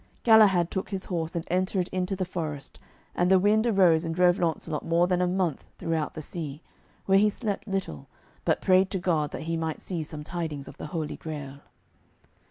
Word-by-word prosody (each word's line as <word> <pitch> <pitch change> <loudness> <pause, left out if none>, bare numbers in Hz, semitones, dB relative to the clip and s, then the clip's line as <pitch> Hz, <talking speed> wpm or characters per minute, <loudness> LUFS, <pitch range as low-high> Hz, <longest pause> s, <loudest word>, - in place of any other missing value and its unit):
Galahad 205 -7 +6
took 190 - -3
his 195 -2 -4
horse 165 -3 -3
and 170 - -2
entered 185 0 +1
into 185 +1 -1
the 185 0 -2
forest, 155 -6 -5 0.3
and 175 +1 +1
the 190 - +6
wind 215 +4 +3
arose 180 -7 +4
and 165 -1 -3
drove 180 0 +4
Launcelot 160 -2 -1
more 170 +1 +3
than 180 0 +1
a 180 - +2
month 180 -4 -1
throughout 160 -2 -2
the 155 - -6
sea, 155 -2 -6 0.4
where 195 0 +5
he 210 +1 +4
slept 205 -1 -4
little, 190 - -4 0.4
but - - +1
prayed 185 0 +4
to 195 - -2
God 165 -5 0
that - - -6
he 165 +1 -2
might 160 -1 -3
see 175 -4 -4
some 150 -1 -7
tidings 160 -4 -4
of - - -11
the - - -6
Holy 155 -1 -4
Grail. 145 -3 -7
175 Hz, 195 wpm, -27 LUFS, 160-190 Hz, 0.4 s, Galahad